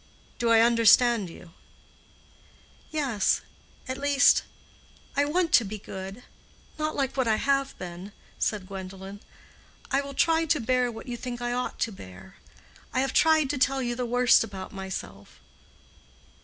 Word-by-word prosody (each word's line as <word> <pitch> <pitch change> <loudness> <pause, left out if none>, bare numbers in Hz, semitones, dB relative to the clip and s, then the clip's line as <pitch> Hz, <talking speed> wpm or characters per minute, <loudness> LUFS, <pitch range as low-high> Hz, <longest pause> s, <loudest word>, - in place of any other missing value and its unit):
Do 235 -1 +1
I 225 -1 +6
understand 230 -2 +4
you?" 165 0 -13 1.4
"Yes—at 260 -1 -2
least, 285 0 +4 0.7
I 285 0 +3
want 335 +2 0
to 235 - +6
be 215 +1 -6
good—not 205 +10 -8
like 270 -2 -1
what 260 -3 0
I 220 - +3
have 275 +3 0
been," 180 +2 -8 0.3
said 210 -3 -1
Gwendolen. 195 +1 -8 0.7
"I 275 0 +2
will 280 -1 -8
try 325 +2 +3
to 305 -1 +1
bear 250 +1 +1
what 225 +3 -10
you 240 -1 -4
think 240 0 -6
I 240 0 -2
ought 250 +1 -3
to 230 - 0
bear. 95 - -13 0.5
I 255 - +1
have 270 - -1
tried 315 -3 +4
to 285 - -3
tell 270 0 +2
you 240 0 -1
the 245 0 -3
worst 245 +1 +4
about 190 -2 -8
myself. 190 - -8
240 Hz, 145 wpm, -27 LUFS, 195-275 Hz, 1.4 s, I